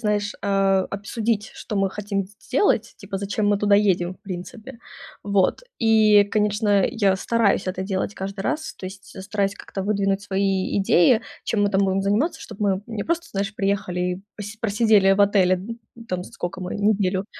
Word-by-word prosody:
знаешь, 210 -2 -1
а, 195 -1 +2
обсудить 215 +2 -2
что 215 - -7
мы 195 -1 +1
хотим 200 -1 -3
с 205 - -21
сделать, 250 - +1
типа 200 -2 -6
зачем 205 +1 -1
мы 205 -1 +2
туда 205 -1 +3
едем, 185 -3 +2
в - - -28
принципе. 215 +6 -8 0.5
Вот 200 - +1 0.2
и, 215 -2 +5
конечно, 205 -1 +2
я 200 -6 +1
стараюсь 220 -2 +1
это 185 0 -3
делать 190 +1 -2
каждый 195 +1 -5
раз, 310 +5 -2
то 185 - -8
есть 190 0 -10
стараюсь 200 0 -1
как-то 195 - -6
выдвинуть 200 -1 0
свои 195 -1 0
идеи, 200 +4 +4 0.2
чем 210 -3 0
мы 205 - +1
там 195 0 +2
будем 190 0 0
заниматься, 215 - 0
чтоб 215 -1 -10
мы 195 -1 +1
не 220 -3 -4
просто, 335 0 -2
знаешь, 195 +1 -2
приехали 195 -3 -1
и 180 +1 -2
пос 205 +1 -7
просидели 210 -2 +4
в 200 - +1
отеле, 195 -2 +4 0.4
н 230 0 -12
там 180 -2 -3
сколько 180 +1 -6
мы 180 - -4
неделю. 200 -2 +1
200 Hz, 180 wpm, -23 LUFS, 195-210 Hz, 0.5 s, и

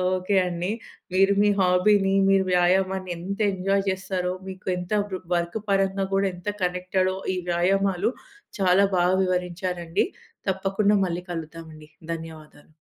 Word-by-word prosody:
Okay 185 +2 -1
అండి. 175 +2 -3 0.4
మీరు 195 +1 +4
మీ 205 - +4
హాబీని, 195 +2 +3 0.2
మీరు 195 0 +4
వ్యాయామాన్ని 185 +1 +2
ఎంత 195 +4 -5
ఎంజాయ్ 195 +1 0
చేస్తారో, 185 -1 -2
మీకు 185 0 -9
ఎంత 180 +1 -7
వ్ 200 -2 -5 0.2
వర్క్ 170 +5 -1
పరంగా 195 0 +1
కూడా 195 0 +2
ఎంత 180 +4 -5
కనెక్టడో, 185 +1 0 0.2
ఈ - - -3
వ్యాయామాలు 195 +4 +1 0.5
చాలా 190 +1 +4
బాగా 180 +1 +3
వివరించారండి. 180 -1 -1 0.4
తప్పకుండా 195 +2 +1
మళ్ళీ 175 0 -3
కలుద్దామండి. 160 -2 -8 0.2
ధన్యవాదాలు. 160 -2 -10
185 Hz, 125 wpm, -25 LUFS, 175-195 Hz, 0.5 s, మీరు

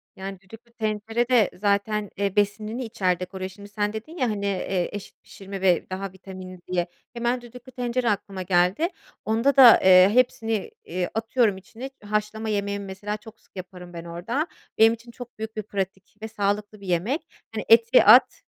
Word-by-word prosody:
Yani, 195 0 -7
düdüklü 225 +4 -15
tencere 220 +2 -2
de 235 -6 +4
zaten, 205 0 0
eee, 200 0 -1
besinini 215 +4 0
içerde 185 -4 -1
koruyor. 185 0 -6
Şimdi, 200 +1 -13
sen 210 0 -2
dedin 270 +11 -8
ya, 255 -6 +1
hani, 200 -2 -3
eee, 190 -2 -1
eşit 205 -1 -9
pişirme 195 -1 -9
ve 180 -3 +2
daha 190 0 -4
vitaminli, 185 -1 -10
diye. 175 -1 0 0.3
Hemen 240 +1 -1
düdüklü 250 +2 -13
tencere 245 -1 -1
aklıma 195 -1 -3
geldi. 185 - +2 0.4
Onda 230 +5 +2
da, 250 -4 +10
eee, 185 0 +8
hepsini, 225 -4 +1
iii, 180 +1 -3
atıyorum 225 -2 +1
içine, 225 +7 -9
haşlama 210 +1 -2
yemeğimi 200 -1 -2
mesela, 205 +2 -5
çok 220 +1 -15
sık - - -32
yaparım 180 -1 -9
ben 170 0 -7
orada. 230 - -3 0.3
Benim 225 +1 +6
için 235 +1 -11
çok 245 -1 -11
büyük 220 0 -5
bir 215 - -3
pratik 195 -1 -5
ve 220 - -4
sağlıklı 205 0 -2
bir 195 - -10
yemek. 190 - 0 0.3
Hani, - - -3
eti 460 +2 +6
at, - - +7
205 Hz, 175 wpm, -25 LUFS, 190-230 Hz, 0.4 s, da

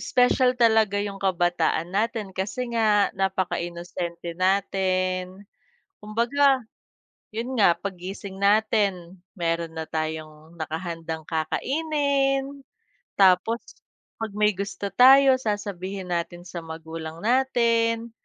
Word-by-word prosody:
special 250 0 +3
talaga 220 -4 +3
yung 200 -1 -5
kabataan 175 -2 0
natin, 215 0 -1
kasi 225 +6 -3
nga 215 -3 +3
napakainosente 175 -2 -3
natin, 185 0 0 0.6
kumbaga 255 +5 +2 0.7
yun 235 +4 -3
nga 185 -5 +5
paggising 190 +1 -7
natin 200 -4 +1 0.2
mayro'n 165 -1 -1
na 160 - -3
tayong 155 0 -5
nakahandang 165 0 -5
kakainin. 275 - -1 0.6
Tapos 195 +4 +4 0.6
pag 220 - -4
may 210 0 +3
gusto 200 +1 -4
tayo 265 +3 +7
sasabihin 200 -4 -4
natin 175 0 -3
sa 170 -1 -7
magulang 160 0 -8
natin, 235 -2 +1
195 Hz, 95 wpm, -25 LUFS, 175-230 Hz, 0.7 s, tayo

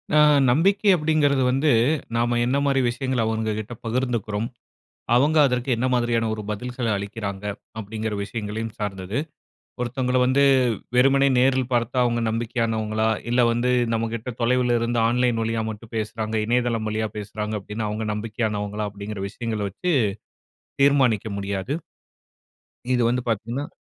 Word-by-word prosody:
அ. - - +6 0.3
நம்பிக்கை 195 - +3
அப்படிங்குறது 150 -4 +2
வந்து, 140 +3 +2 0.4
நம்ப 120 +1 +1
என்ன 130 +3 +1
மாரி 135 -1 +2
விஷயங்கள்ல, 130 -1 -1
அவங்க 110 -1 -1
கிட்ட 110 +3 -6
பகிர்ந்துக்குறோம். 115 -3 -1 0.7
அவங்க 145 +6 +3
அதற்கு 125 0 -2
என்ன 120 +3 -1
மாரியான 120 -2 +1
ஒரு 110 - -4
பதில்கள்ல 120 +2 -3
அளிக்கிறாங்க. 100 0 -5 0.3
அப்படிங்குற 110 +1 -4
விஷயங்களையும் 110 +1 -5
சார்ந்தது, 100 +2 -3 0.6
ஒருத்தவங்களை 125 +1 0
வந்து 130 +2 +3 0.5
வெறுமனே 135 +2 +5
நேரில் 130 -1 +2
பாத்தா, 120 +1 0
அவங்க 120 -1 +1
நம்பிக்கையானவங்களா? 110 -1 -1 0.2
இல்ல, 125 - +4
வந்து 120 +2 +1 0.2
நம்மகிட்ட 115 +2 -3
தொலைவிலிருந்து 120 -1 +2
ஆன்லைன் 120 -1 +1
வழியா 115 0 -1
மட்டும் 110 +2 -9
பேசுறாங்க. 110 0 -3
இணையதளம் 120 -2 +1
வழியா 110 +1 -1
பேசுறாங்க 105 +1 -4
அப்டீன்னா, 105 +2 -4
அவங்க 110 +1 -3
நம்பிக்கையானவங்களா? 105 -1 -2
அப்டீங்குற 100 0 -6
விஷயங்கள்ல 110 -2 -3
வச்சு 175 - -1 0.9
தீர்மானிக்க 130 -7 +3
முடியாது. 100 +6 -3 1.2
இது 125 - +2
வந்து 125 +1 0
பாத்தீங்கன்னா 115 +6 -2
115 Hz, 125 wpm, -23 LUFS, 110-125 Hz, 1.2 s, அ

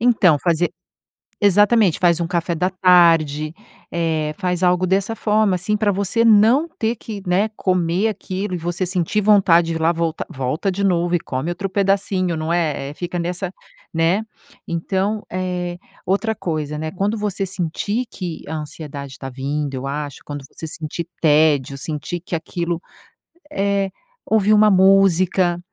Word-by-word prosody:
Então 210 -10 +4
fazer 170 +2 +1 0.7
exatamente 205 -2 +4
faz 170 -1 +3
um 170 - -1
café 170 -1 -1
da 180 +3 0
tarde, 165 -5 +4 0.4
eh, 160 -2 -1
faz 180 -2 -1
algo 180 0 +3
dessa 195 +4 +1
forma, 210 -3 +2
assim, 205 +4 -1
pra 210 -1 +1
você 200 +4 0
não 230 +8 +5
ter 235 -7 -2
que, 210 -2 -8
né, 195 +5 +2
comer 180 +2 +1
aquilo 195 -2 -4
e - - -2
você 175 +2 -2
sentir 180 +2 0
vontade 190 -5 +5
de 165 - -1
ir 160 - -3
lá, 165 - +4
volta 165 -1 -2
volta 135 +9 -2
de 200 +2 -3
novo 175 -2 +1
e - - +1
come 135 +3 -4
outro 195 +3 -4
pedacinho, 190 -3 0
não 155 +2 -2
é, 150 -5 -1
é, - - -10
fica 175 +2 -4
nessa, 180 +2 -3 0.4
né. 165 +5 +2 0.4
Então, 190 +5 -2
eh, 180 -1 -3 0.3
outra 200 +4 0
coisa, 155 -6 -3
né, 155 +1 -4
quando 200 +4 -1
você 205 -2 -2
sentir 195 +6 -2
que 175 -4 -6
a 160 - -4
ansiedade 145 -3 -7
tá 135 - -6
vindo, 140 +2 -3
eu 130 +1 -4
acho, 145 0 -5
quando 145 -2 -7
você - - -8
sentir 160 +1 -4 0.2
tédio, 150 -3 +3
sentir 155 +4 -4
que 180 -2 -4
aquilo 170 +1 -3 0.7
é 200 -5 0 0.3
ouvir 215 -1 +3
uma 210 0 +6
música, 185 -2 +4
180 Hz, 160 wpm, -20 LUFS, 160-195 Hz, 0.7 s, uma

